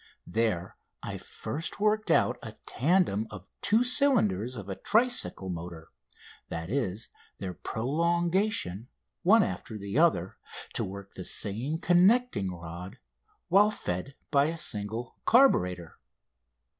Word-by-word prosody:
There 100 -3 -1 0.3
I - - -4
first 160 +7 -6
worked 215 +1 +1
out - - +3
a - - -8
tandem 140 - +1
of 105 -2 -11
two 220 +4 +3
cylinders 130 - +2
of 105 -4 -7
a 100 - -3
tricycle 220 - +1
motor 85 -1 -7 0.6
that 80 +3 -5
is, 115 -5 -1 0.3
their 95 -2 -5
prolongation, 170 - 0 0.3
one 205 +4 +6
after 100 - -5
the 100 +6 -2
other, 100 - +2 0.4
to - - 0
work 100 +1 -8
the 95 - -7
same 115 - -2
connecting 180 - +3
rod 85 +2 -8 0.5
while 200 +4 +5
fed 135 - -4 0.2
by 140 -1 +4
a 165 +2 -2
single 110 -4 -2
carburator. 90 - +3
115 Hz, 120 wpm, -29 LUFS, -, 0.6 s, one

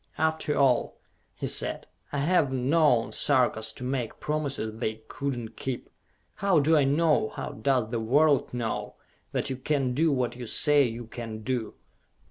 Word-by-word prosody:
"After 160 -1 0
all," 130 -4 +2 0.4
he - - -5
said, - - 0 0.3
"I 145 - -2
have 150 -1 +2
known 130 -4 +2
Sarkas 110 -1 +1
to - - -7
make 125 -3 -3
promises 140 -8 -3
they 110 -2 -3
could 140 -2 -3
not 115 -2 -7
keep! 130 -2 -5 0.5
How 195 -4 +3
do 155 +3 +4
I 145 -3 +4
know, 150 -4 +2
how - - -6
does 120 -1 0
the 120 - -1
world 140 +5 +3
know, 120 -2 -3 0.4
that - - -2
you 130 - -3
can 135 -1 0
do 160 +4 +2
what 125 -3 0
you 120 -1 -7
say 145 +3 +4
you 120 0 -5
can 115 -2 -7
do?" 120 -1 -2
130 Hz, 165 wpm, -27 LUFS, 120-150 Hz, 0.5 s, do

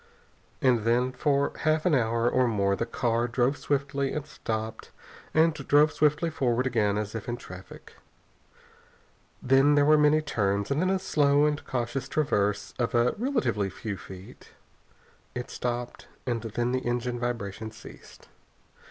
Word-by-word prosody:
And 125 -3 +4
then 120 +3 +1
for 140 +2 +1
half 155 0 +1
an 180 - +3
hour 115 -2 +2
or 125 +1 +3
more 100 -3 +1
the 115 - -3
car 115 0 0
drove 125 +3 +1
swiftly, 140 -1 -1
and 150 -2 -3
stopped, 110 -6 -5 0.4
and 160 +1 +4
drove 150 +1 +3
swiftly 155 +2 +2
forward 125 -4 0
again 105 -5 +1
as 105 0 -3
if 115 +1 -5
in 120 - -2
traffic. 95 -5 -12 1.5
Then 135 +3 +4
there 145 0 +4
were 155 +1 +5
many 150 +1 +4
turns, 100 -5 -1
and 140 +3 +1
then 185 - +1
a 190 - +2
slow 145 -5 +3
and 150 0 -1
cautious 125 +1 -2
traverse 105 -9 0
of 120 0 0
a 120 +1 +3
relatively 120 - 0
few 100 +2 -5
feet. 95 0 -12 0.9
It 125 0 -5
stopped, 120 0 -4 0.2
and 120 -3 -1
then 120 +2 -2
the 130 - +1
engine 120 0 -2
vibration 110 -3 -4
ceased. 110 0 -14
125 Hz, 150 wpm, -27 LUFS, 115-145 Hz, 1.5 s, were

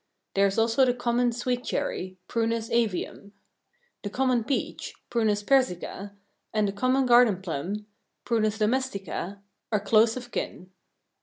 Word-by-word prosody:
There 200 0 +4
is 195 - -3
also 230 +3 +3
the 250 -1 +3
common 245 0 +1
sweet 245 +1 -2
cherry 185 -5 -3
(Prunus 230 -1 -1
avium). 210 -3 -1 0.7
The 205 - -4
common 255 0 +1
peach 275 - -3 0.2
(Prunus 215 -3 +1
persica) 205 -6 0 0.4
and 215 -1 +1
the - - -1
common 255 +5 +1
garden 240 -6 +5
plum 190 +5 -4 0.4
(Prunus 220 -2 +1
domestica) 205 -5 -2 0.3
are 210 - +2
close 220 +3 +4
of 245 -1 -8
kin. 185 +1 -5
225 Hz, 135 wpm, -27 LUFS, 200-245 Hz, 0.7 s, garden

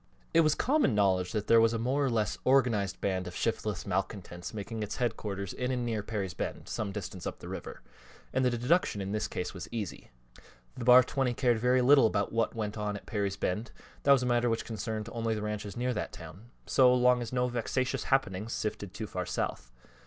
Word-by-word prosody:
It 165 - +5
was 155 -1 +3
common 280 - +2
knowledge 95 -3 +2
that 105 -2 -2
there 115 0 +6
was 115 0 +4
a - - 0
more 130 +5 0
or 135 - +2
less 110 -5 0
organized 115 -8 +2
band 95 -2 -1
of 90 - -8
shiftless 105 -4 -2
malcontents 95 -2 -3
making 110 +1 -5
its 105 - -3
headquarters 105 -5 -3
in 125 0 -2
and 125 -2 -1
near 115 -3 -1
Perry's 100 -4 -3
Bend, - - -5
some 105 -2 -3
distance 95 -3 -6
up - - -5
the - - -10
river, - - -7 0.5
and 130 - +2
the 125 - +4
deduction 125 - +1
in 100 0 -3
this 105 0 -1
case 90 - -4
was 90 -3 -7
easy. 110 -5 -5 0.7
The 120 - -5
Bar 125 +1 +9
20 130 -1 -1
cared 120 -3 +2
very 125 +2 +3
little 135 -1 +7
about 100 -2 -1
what 115 0 0
went 105 -1 -3
on 105 -1 -2
at - - -13
Perry's 100 -2 -2
Bend 105 +5 -2 0.3
that 140 - +4
was 135 -2 +6
a - - 0
matter 120 -1 +2
which 115 0 -1
concerned 110 -1 -4
only 115 -1 -1
the 105 - -4
ranches 105 -1 -4
near 125 +1 0
that 105 - -4
town 105 +8 -11 0.2
so 130 -2 +5
long 125 0 +4
as 115 - -5
no 125 -1 +1
vexatious 125 +2 -1
happenings 110 -5 0
sifted 100 -3 -4
too 110 - -4
far 90 -3 -4
south. 60 - -3
110 Hz, 215 wpm, -30 LUFS, 100-125 Hz, 0.7 s, Bar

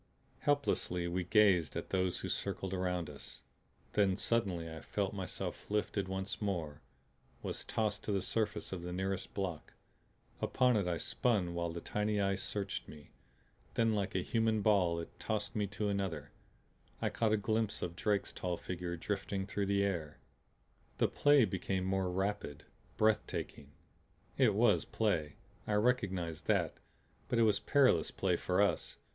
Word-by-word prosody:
Helplessly 135 -11 +1
we 90 +1 -1
gazed 95 -4 +4
at - - -4
those 95 -1 +1
who - - -3
circled 95 -1 -2
around 90 -2 -1
us. 70 -4 -10 0.5
Then 100 -3 +3
suddenly 100 -6 0
I 80 0 -7
felt 100 -2 -2
myself 95 -2 -5
lifted 105 -2 0
once 95 +2 -3
more, 85 -8 -2 0.6
was - - -2
tossed 105 -2 -1
to - - -1
the 100 - +2
surface 105 -3 -1
of 90 - -4
the 90 +1 -5
nearest 95 +1 -3
block. 90 -6 -3 0.7
Upon 125 -1 +3
it 100 -4 +1
I 85 -1 0
spun 100 -7 0
while 85 0 -1
the 85 0 -5
tiny 105 +2 0
eyes 100 0 +1
searched 100 -1 -3
me. 75 -1 -12 0.6
Then 115 -1 +3
like 100 -3 -1
a 90 - +1
human 110 -1 +1
ball 90 -6 +3
it 85 - -9
tossed 110 -2 -2
me 105 -2 +1
to 105 +1 -2
another. 90 -8 -2 0.7
I - - 0
caught 110 -2 +1
a 110 - +4
glimpse 110 +1 0
of 85 -1 -3
Drake's 100 +1 0
tall 90 -2 -2
figure 90 -1 -4
drifting 95 +1 -2
through 100 0 -2
the 100 0 +2
air. 85 -6 -2 0.8
The - - +3
play 145 -4 +5
became 95 -1 -2
more 95 -1 +1
rapid, 95 -5 -2 0.3
breathtaking. 105 -9 0 0.6
It - - +4
was 105 -6 +4
play; 85 -9 0 0.3
I 105 - 0
recognized 100 -7 0
that. - - +2 0.6
But 120 - +1
it 115 - +5
was 105 -3 +4
perilous 130 - +4
play - - +1
for - - +2
us. - - 0
95 Hz, 160 wpm, -34 LUFS, 90-105 Hz, 0.8 s, play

